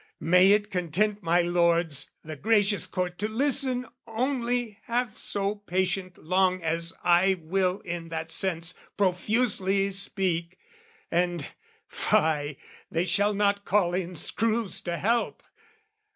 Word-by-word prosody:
May 180 +4 +5
it 205 0 0
content 195 +4 0
my 175 0 +2
lords 170 -4 +1
the 155 0 -7
gracious 205 +2 +2
Court 180 -1 -3
To 210 - 0
listen 255 +1 +1 0.2
only 240 -2 -1
half 240 -2 -2
so 200 0 0
patient 185 -2 -2
long 185 +1 +1
As 165 +1 0
I 180 +2 +4
will 185 +3 0
in 170 -1 -5
that 160 0 -4
sense 175 -2 0 0.2
profusely 195 0 +1
speak, 185 -3 -2 0.5
And 175 -3 -1 0.3
fie, 150 -2 +1 0.3
they 165 +2 0
shall 205 +4 +2
not 200 0 +1
call 185 -4 +2
in 180 -1 -2
screws 225 +5 -1
to 175 -1 -2
help! 230 +6 0
185 Hz, 125 wpm, -27 LUFS, 170-210 Hz, 0.5 s, May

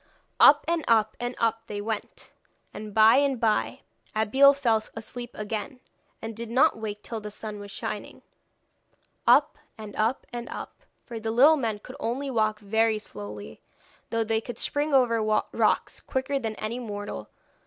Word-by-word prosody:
Up, - - +7
and 335 -1 0
up, 220 -2 +3
and 245 +1 -3
up 225 0 0
they 205 - -5
went; 215 0 -5 0.4
and 210 0 -7
by 220 +3 +6
and 275 -3 +2
by 120 - 0 0.3
Abeille 265 +6 +5
fell 235 -6 +2
asleep 240 +2 -6
again, 215 +5 -5 0.4
and 225 0 -5
did 230 0 -6
not 265 +7 +4
wake 210 -1 -5
till 225 -2 -5
the 210 - -6
sun 210 0 -7
was 205 0 -9
shining. - - -6 1.0
Up, - - +5 0.2
and 215 -2 -9
up, 225 +5 0
and 240 0 -5
up, - - -8 0.2
for 235 -2 -6
the 220 0 -3
little 270 +8 +6
men 230 -7 -2
could 250 +5 -12
only 265 +4 -2
walk 215 -3 +1
very 220 +2 +2
slowly, 105 - -9 0.5
though 230 0 0
they 220 0 0
could 240 -1 -8
spring 290 +4 -1
over 245 -4 +3 0.3
rocks - - +1
quicker 265 +1 -2
than 225 -3 -4
any 220 +4 -4
mortal. 205 -3 -6
225 Hz, 165 wpm, -26 LUFS, 215-250 Hz, 1.0 s, Up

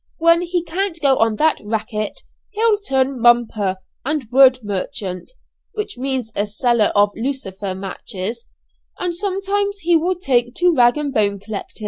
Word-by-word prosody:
When 335 +1 +4
he 350 -1 -1
can't 350 +1 -2
go 280 -3 +4
on 225 -1 +2
that 315 +6 +2
'racket,' 215 0 -3 0.3
he'll 430 0 +2
turn 265 -7 0
'mumper' 225 -5 +3 0.3
and 290 -3 -2
wood 260 0 +6
merchant 190 -2 -4 0.4
(which 425 -1 -4
means 255 -2 -3
a 205 +1 0
seller 230 +1 +2
of 205 0 +4
lucifer 205 -7 -4
matches); 195 +4 -6 0.5
and 355 -1 -2
sometimes 400 +2 -2
he 345 +1 +3
will 350 +3 +1
take 245 -8 0
to 355 -1 +3
rag 240 0 +4
and 290 -2 -3
bone 200 -2 +1
collecting." 205 +2 -7
260 Hz, 150 wpm, -20 LUFS, 215-340 Hz, 0.5 s, wood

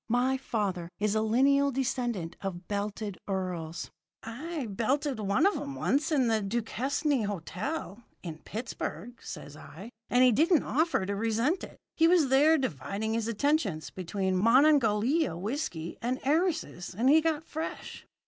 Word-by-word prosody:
My 250 +3 +2
father 200 -9 -2
is 210 0 +1
a 215 - +2
lineal 275 +6 +3
descendant 240 -9 -2
of 180 -3 -5
belted 205 -1 -3
earls.' 180 -4 -4 0.3
"'I 275 +3 -5
belted 260 +5 0
one 210 - +2
of 400 - +3
'em 280 -1 -5
once 290 +5 0
in 275 -5 +3
the 220 -1 +2
Duquesne 240 +5 -1
Hotel, 200 - -4 0.2
in 160 -3 -6
Pittsburgh,' 230 0 -6
says 145 - -8
I, 185 +8 -11 0.2
'and 245 +1 +4
he 255 - +6
didn't 320 - +3
offer 315 - +1
to 200 +1 -2
resent 230 - 0
it. - - -9 0.2
He 330 - +5
was 335 -6 +4
there 295 +5 +5
dividing 215 - -2
his 225 -1 -1
attentions 230 - 0
between 190 +1 -2
Monongahela 255 - +4
whiskey 180 - -4
and 250 +3 -1
heiresses, 305 - 0
and 240 +4 +2
he 310 +4 +6
got 315 -1 0
fresh.' 315 0 -6
230 Hz, 150 wpm, -29 LUFS, 200-280 Hz, 0.3 s, he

